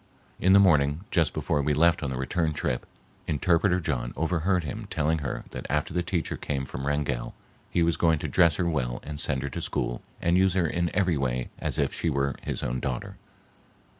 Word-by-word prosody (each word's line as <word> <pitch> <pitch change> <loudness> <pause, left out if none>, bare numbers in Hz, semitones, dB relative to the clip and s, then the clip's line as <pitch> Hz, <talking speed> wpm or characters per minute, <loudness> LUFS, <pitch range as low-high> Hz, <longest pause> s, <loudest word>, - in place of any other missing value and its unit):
In 95 +1 +4
the 100 - +8
morning, 75 -5 +4
just 85 -5 +3
before 75 - 0
we 75 +1 +1
left 85 +2 +4
on 70 - -2
the 65 - -3
return 80 +5 0
trip, 60 -4 -2 0.4
interpreter 90 +5 +2
John 65 -8 -2
overheard 85 +3 +1
him 75 - -5
telling 80 +2 +1
her 70 - -4
that - - -6
after 75 +2 0
the 90 - +1
teacher 85 -2 -2
came 70 -2 -3
from 65 +1 -5
Wrangell, 70 -5 -1 0.3
he 85 - +2
was 85 -1 +1
going 80 -2 +3
to - - -4
dress 85 -4 +4
her 85 - 0
well 65 -7 -1
and 75 -1 -6
send 65 -3 0
her 70 - -2
to - - -5
school - - -2 0.2
and 85 +2 +3
use 95 -1 +3
her 90 -3 +3
in 85 +2 0
every 90 -5 +2
way 65 -2 -1
as - - -2
if - - +1
she 85 - 0
were 70 -1 0
his - - -4
own 65 +1 -1
daughter. 65 0 -4
75 Hz, 210 wpm, -27 LUFS, 70-85 Hz, 0.4 s, the